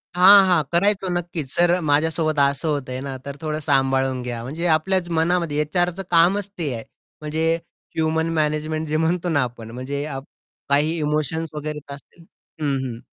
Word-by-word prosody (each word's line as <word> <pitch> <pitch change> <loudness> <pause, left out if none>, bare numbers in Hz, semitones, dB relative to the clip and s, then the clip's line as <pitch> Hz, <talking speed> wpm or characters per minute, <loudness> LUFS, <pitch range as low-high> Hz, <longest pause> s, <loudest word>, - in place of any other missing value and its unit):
हां, 195 +2 +8
हां 175 -4 +3
करायचो. 195 +2 +2
नक्कीच. 170 -5 -4
"सर, 175 +1 +3
माझ्यासोबत 155 0 +1
असं 140 +3 +2
होतंय 130 -3 -2
ना, 135 - -4
तर 140 0 -5
थोडं 155 -1 -2
सांभाळून 135 -2 +1
घ्या". 120 -2 -4
म्हणजे 155 +8 -4
आपल्याच 180 +2 -1
मनामध्ये 165 -2 +1
एचआरचं 175 +4 -1
कामच 185 +4 +3
ते 155 -6 -2
आहे. 115 -1 -5 0.4
म्हणजे 160 +2 0 0.4
ह्युमन 160 0 +1
मॅनेजमेंट 155 0 -1
जे 155 +1 0
म्हणतो 170 +2 0
ना 145 -4 +2
आपण 115 -2 -7
म्हणजे 130 +4 -4
आप 135 -3 -5 0.5
काही 150 +4 +2
इमोशन्स 155 +1 -1
वगैरे 150 0 -4
येत 145 -1 -11
असतील 155 +4 -15 0.4
हं, 145 -2 +1
हं. 115 -2 -5
155 Hz, 165 wpm, -22 LUFS, 140-170 Hz, 0.5 s, हां